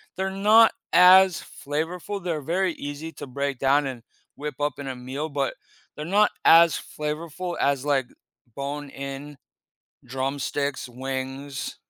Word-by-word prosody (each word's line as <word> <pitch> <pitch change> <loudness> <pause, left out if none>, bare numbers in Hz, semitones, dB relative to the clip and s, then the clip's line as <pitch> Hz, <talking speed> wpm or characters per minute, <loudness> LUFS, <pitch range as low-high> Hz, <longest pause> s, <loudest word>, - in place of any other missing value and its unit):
They're 190 +1 -1
not 210 +4 +5 0.2
as 185 0 +7 0.2
flavorful, 170 +6 -3
they're 165 -4 -2
very 175 +4 0
easy 145 +3 -6
to - - -8
break 140 +1 -3
down 140 +1 +3
and 120 -3 -7 0.3
whip 150 -1 -5
up 145 0 -1
in 140 -1 -6
a 130 - -4
meal, 130 +5 -5
but 140 -2 -2 0.4
they're 150 - -6
not 205 +5 +4 0.2
as 165 0 +7
flavorful 165 +4 -5
as, 140 -2 +1
like, 140 -3 +1 0.5
bone-in 140 0 -6 0.7
drumsticks, 135 +2 -2
wings. 135 +2 -5
145 Hz, 130 wpm, -25 LUFS, 135-170 Hz, 0.7 s, as